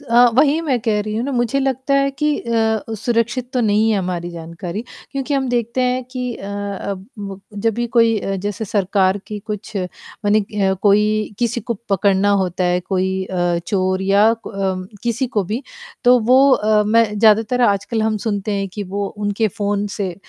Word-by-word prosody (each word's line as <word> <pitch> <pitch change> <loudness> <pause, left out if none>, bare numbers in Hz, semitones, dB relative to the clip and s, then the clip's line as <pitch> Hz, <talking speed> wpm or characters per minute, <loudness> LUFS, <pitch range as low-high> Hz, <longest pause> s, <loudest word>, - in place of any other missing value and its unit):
स - - -17
अ, 240 +1 +7
वही 290 +5 +4
मैं 275 -7 0
कह 215 -1 +1
रही 215 0 -4
हूँ 230 - -1
ना, 280 - -3
मुझे 240 +2 +1
लगता 265 +1 0
है 275 0 +3
कि 295 +2 0
अ 235 - -4 0.4
अ, 225 - -3
सुरक्षित 235 +3 -1
तो 250 - +1
नहीं 215 0 +3
है 210 - +2
हमारी 175 -2 -3
जानकारी, 170 +4 -6 0.3
क्योंकि 275 +1 -2
हम 270 -2 0
देखते 240 0 -1
हैं 250 0 +1
कि 250 -2 -3
अ - - -10 0.4
अब 195 0 -5
व 195 -2 -6 0.3
जब 225 - +2
भी 240 0 -1
कोई 230 -1 +5
अ, 195 - -2
जैसे 205 +2 -3
सरकार 195 -1 +1
की 210 - -5
कुछ, 210 0 -6 0.5
मने 210 0 +3
है 195 -2 +2
कोई 210 +1 +2
किसी 235 0 0
को 235 +2 -3
पकड़ना 195 0 +2
होता 180 0 -2
है, 180 0 +2
कोई 190 0 -1
अ, 175 -2 0
चोर 185 -1 0
या 200 +3 +4
क - - -6
अम, 190 -2 -2 0.2
किसी 240 +2 0
को 210 -5 -1
भी, 220 +9 -3 0.4
तो 250 0 +7
वो 260 +5 +5
अ, 215 -3 +3
मैं 230 +2 +5
ज़्यादातर 220 +3 +4
आजकल 205 +3 0
हम 220 0 +1
सुनते 205 0 -1
हैं 195 0 -2
कि 205 +3 -6
वो 200 0 -1
उनके 210 +1 0
फ़ोन 205 +1 -2
से, 190 -4 -2
215 Hz, 200 wpm, -19 LUFS, 195-240 Hz, 0.5 s, अ